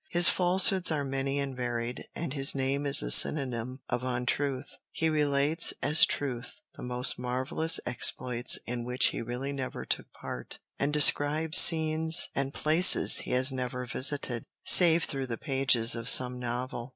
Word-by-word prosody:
His 175 0 +3
falsehoods 185 0 +1
are 150 -2 -3
many 135 0 -5
and 140 -2 -6
varied, 120 -1 -7
and 165 -5 -7
his 135 -1 +1
name 140 +2 -4
is 140 - +2
a - - -3
synonym 130 - +4
of 125 - -5
untruth. 130 +2 -5 0.2
He 160 - -4
relates, 150 +1 -2
as 150 +2 +4
truth, 135 +6 -6
the - - -15
most 125 +1 -4
marvellous 130 +6 -2
exploits 125 0 0
in 120 +1 -7
which 125 +1 -1
he - - -8
really 125 +4 -7
never 130 -2 -8
took - - -5
part, 60 - -9 0.2
and 140 - -3
describes 150 +2 +3
scenes 160 0 +4
and 135 0 -5
places 160 +5 +4
he - - -8
has 130 +2 +3
never 125 -1 -7
visited, 130 -1 -2 0.2
save 170 -2 +6
through 135 -3 -6
the 115 -2 -7
pages 130 -4 0
of 115 0 -5
some 125 -1 +3
novel. 120 0 -7
135 Hz, 160 wpm, -26 LUFS, 125-150 Hz, 0.2 s, save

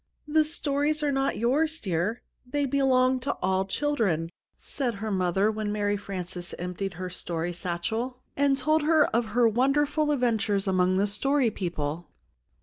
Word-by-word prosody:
"The 310 +1 +4
stories 300 -1 -1
are 290 - +2
not 270 0 0
yours, 300 +8 +1
dear; 190 - -2 0.2
they 280 +3 -1
belong 260 -1 +3
to 275 +3 -1
all 190 +1 0
children," 195 - 0 0.3
said 250 -6 -3
her 215 +2 -4
mother, 190 +2 +2
when 215 -1 -3
Mary 205 -1 0
Frances 185 -3 -5
emptied 180 +1 -4
her 185 +2 -4
story 175 -1 -4
satchel, 220 +9 -3 0.2
and 280 -1 +2
told 310 +2 +2
of 295 -7 +3
her 230 +2 +3
wonderful 290 +6 +2
adventures 225 -7 +1
among 185 -1 +2
the 200 - +3
Story 250 +4 +1
People. 170 -4 -4
220 Hz, 145 wpm, -27 LUFS, 185-275 Hz, 0.3 s, The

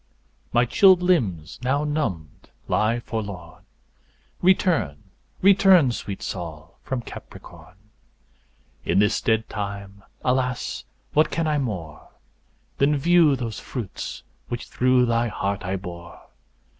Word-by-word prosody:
My 120 +1 +3
chilled 185 - +5
limbs 100 - 0
now 135 +3 +1
numbed 145 - -3 0.2
lie 115 +3 +1
forlorn; 100 -8 -6 0.8
Return; 175 - +2 0.4
return, 190 - +6
sweet 100 -4 -6
Sol, 85 -3 -7
from 130 -3 -4
Capricorn; 90 - -12 1.1
In 85 - 0
this 105 +1 +3
dead 110 0 +1
time, 100 -1 -6 0.2
alas, 125 -1 -1 0.3
what 155 +1 +4
can 165 - -1
I 150 -1 +1
more 90 - -5 0.7
Than 145 +1 +3
view 165 -1 +4
those 115 -5 -4
fruits 120 -8 -6 0.2
which 120 - -5
through 125 0 +3
thy 115 0 +1
heart 100 -1 -3
I 95 +1 -2
bore? 85 -2 -8
115 Hz, 115 wpm, -24 LUFS, 95-145 Hz, 1.1 s, return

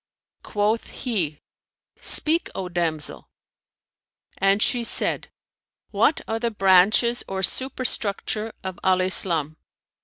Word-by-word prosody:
Quoth 215 +2 -1
he, 180 - -4 0.6
"Speak, 325 +2 +3
O 190 - -4
damsel;" 170 -4 -2 1.1
and 195 +1 +2
she 245 -1 0
said, - - 0 0.6
"What 315 - +1
are 225 0 -2
the 235 0 -1
branches 205 +4 +3
or 190 0 -4
superstructure 225 -2 0
of 185 -1 -6
Al 185 -1 +2
Islam?" 165 -5 +1
195 Hz, 100 wpm, -23 LUFS, 180-230 Hz, 1.1 s, Speak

